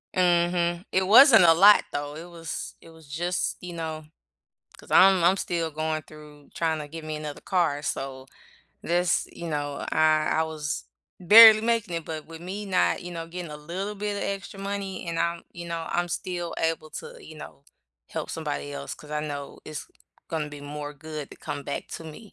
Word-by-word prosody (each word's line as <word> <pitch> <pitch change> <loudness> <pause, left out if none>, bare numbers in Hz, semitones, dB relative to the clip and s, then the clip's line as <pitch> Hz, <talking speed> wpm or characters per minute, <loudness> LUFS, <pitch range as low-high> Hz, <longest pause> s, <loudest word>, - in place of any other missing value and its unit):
Mhm. 175 0 +2
It 190 0 +2
wasn't 225 - +9
a 165 -1 +7
lot, 200 +5 +7
though. 145 0 -4
It 170 +3 -9
was 165 -1 -6
it - - -16
was 160 -2 -17
just 175 +5 -2
you 180 -1 -7
know? 160 -2 -5 0.7
'Cause - - -16
I'm 190 -2 +6
I'm 185 +3 +4
still 165 -3 -2
going 155 0 -2
through 150 -1 -15
tryna 160 -2 0
to - - -10
get 160 +1 -9
me 155 - -4
another 150 -1 -7
car. 165 -6 0
So, 135 -3 -4 0.6
this 175 +1 +1
you 170 - -7
know, 145 -2 -3
I 155 -1 +3
I - - +4
was 155 -1 -4 0.4
barely 215 +4 +10
making 225 -6 0
it, 165 - -3
but 155 -2 -6
with 165 0 -11
me 195 +4 -6
not, 185 -2 +1
you 175 0 -7
know, 165 -1 -5
getting 175 -1 -7
a 150 - -7
little 185 +7 -5
bit 205 0 -3
of - - -3
extra 195 0 -5
money, 195 -2 -4
and 165 0 -2
I'm, 170 0 -1
you 170 0 -8
know, 165 -1 -4
I'm 175 0 0
still 175 -1 -4
able 160 -1 -1
to, - - -8
you 155 - -12
know, 140 -2 -11 0.4
help - - -5
somebody 70 0 -4
else- 70 0 -6
'cause 150 - -14
I 150 0 -1
know 145 -2 -6
it's 155 -2 -7 0.4
gonna 155 -2 -2
be 145 -1 -10
more 145 0 -6
good 155 0 -7
that - - -14
come 140 - -5
back 140 - -4
to 165 - -7
me. 175 +7 -11
165 Hz, 200 wpm, -26 LUFS, 150-180 Hz, 0.7 s, barely